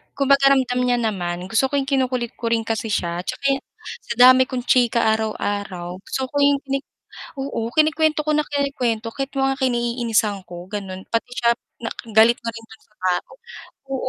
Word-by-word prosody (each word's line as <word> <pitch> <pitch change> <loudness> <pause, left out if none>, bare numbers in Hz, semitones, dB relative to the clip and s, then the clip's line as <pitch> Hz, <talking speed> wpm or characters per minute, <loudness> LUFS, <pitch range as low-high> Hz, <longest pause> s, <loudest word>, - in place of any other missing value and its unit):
kumbaga 275 0 +4
ramdam 250 -2 +1
niya 245 -1 +2
naman, 180 -5 -2
gusto 245 +4 +3
ko 285 - -4
'yong 275 0 0
kinukulit 255 -3 0
ko 230 - -1
rin 225 -1 +1
kasi 225 0 -2
siya. 175 -5 -1
At - - -19
tsaka 275 -1 0 0.5
sa 235 - -2
dami 255 +1 +7
kong 250 -2 -4
chika 240 -2 +3
araw-araw, 200 -4 -3
gusto 265 - -4
ko - - -14
'yong 280 -1 +3
kinik 275 0 -2 0.6
oo 235 -4 -3
kinikwento 310 +1 +2
ko 305 - +2
na 300 - +3
kinuwento 260 -6 -1
kahit 275 0 -3
yung 270 - +3
mga 270 - -8
kinaiinisan 235 -5 0
ko 175 0 -8
gano'n, 190 -2 -6
pati 230 +2 -2
siya 235 -1 +2 0.6
galit 220 +2 +6
na 230 - -2
rin 225 0 -11
dun 220 0 -17
sa 210 - -31
tao. 180 -1 -1 0.6
Oo. 260 - -2
240 Hz, 185 wpm, -21 LUFS, 220-270 Hz, 0.6 s, dami